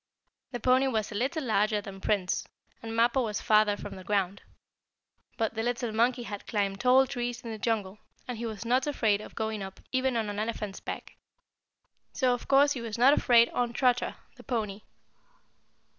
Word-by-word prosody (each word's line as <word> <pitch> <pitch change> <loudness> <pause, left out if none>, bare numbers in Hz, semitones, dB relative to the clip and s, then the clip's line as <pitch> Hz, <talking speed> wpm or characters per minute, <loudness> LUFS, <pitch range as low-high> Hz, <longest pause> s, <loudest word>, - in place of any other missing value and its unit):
The 245 - -4
pony 255 +3 +3
was 220 -4 -1
a - - -6
little 275 +8 -1
larger 215 -2 +2
than 195 -1 -9
Prince, 190 -3 0 0.3
and 225 - -6
Mappo 235 +3 +3
was 215 -3 -2
farther 215 -1 +3
from 205 -1 -7
the 190 - -10
ground. 200 -1 -1 1.0
But 225 -2 0
the 225 - -2
little 240 0 -1
monkey 240 +3 +1
had 205 -3 -7
climbed 200 -2 -1
tall 255 +1 +5
trees 245 -1 -4
in 235 -2 -7
the 220 - -6
jungle, 210 -3 -1 0.3
and 245 -3 -5
he 235 - -3
was 220 0 -6
not 255 +4 +2
afraid 220 -8 +1
of - - -11
going 220 -1 -2
up 190 0 -8
even 260 -1 +1
on 220 -2 -1
an 205 0 -4
elephant's 215 -2 -3
back. - - -7 1.0
So, 255 -2 +2
of 245 - -5
course, 280 +1 +5
he 260 -5 -2
was 230 -1 -5
not 255 +4 +6
afraid 235 -4 +5
on 240 -1 -1
Trotter, 245 0 +1 0.2
the - - -13
pony. 215 -5 -3
230 Hz, 190 wpm, -29 LUFS, 210-245 Hz, 1.0 s, not